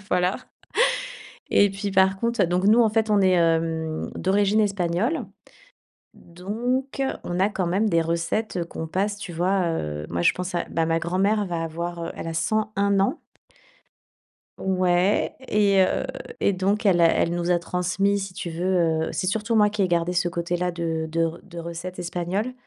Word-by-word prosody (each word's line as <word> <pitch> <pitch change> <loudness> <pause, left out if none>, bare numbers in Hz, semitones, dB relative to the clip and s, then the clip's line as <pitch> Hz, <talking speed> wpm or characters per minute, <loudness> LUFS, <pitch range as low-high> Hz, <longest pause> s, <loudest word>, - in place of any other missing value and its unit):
Voilà, 180 +1 +2 1.1
et 200 -1 +5
puis, 195 +1 -4
par 190 0 +3
contre, 235 0 +1
donc, 180 +2 0
nous, 220 +4 +6
en 220 - +4
fait, 220 0 +1
on 205 -1 +4
est, 190 -1 +4
hem, 165 -2 0
d'origine 200 +3 +2
espagnole. 200 - 0 0.9
Donc 240 +10 -3 0.2
on 175 +1 -3
a, 195 - +4
quand 190 -4 -2
même, 200 +5 +1
des 165 -3 +3
recettes 170 +3 -1
qu'on 160 - -5
passe, 200 +5 -1
tu 180 - -7
vois. 180 +2 +1
Heu, 75 - -3
moi, 85 0 -1
je - - +5
pense 180 0 -5
à 175 - 0
bah, 165 0 0
ma 165 0 +1
grand-mère 195 +5 +1
va 170 -2 -3
avoir, 170 +1 -4
elle - - -6
a 165 - -4
101 200 +2 +1
ans. 200 +12 0 1.4
Ouais, 185 +1 +1
et 200 -2 +3
heu, - - 0 0.4
et 200 - +3
donc, 200 +4 0
elle 185 -4 +4
a 170 - +7
elle 165 +1 +2
nous 175 0 0
a 175 - +2
transmis, 185 +3 0
si 190 -2 -6
tu 170 - -5
veux, 165 -2 +1
heu, - - -3
c'est 185 - -1
surtout 220 +3 -1
moi 210 -1 +5
qui 210 -1 -1
ai 185 - +2
gardé 170 0 +1
ce 175 0 +1
côté-là 175 +1 -2
de 165 -2 -2
de 165 +1 +1
re 165 +1 -3
de 175 -3 -10
recettes 170 +2 -6
espagnoles. 180 +7 -2
180 Hz, 180 wpm, -24 LUFS, 170-200 Hz, 1.4 s, a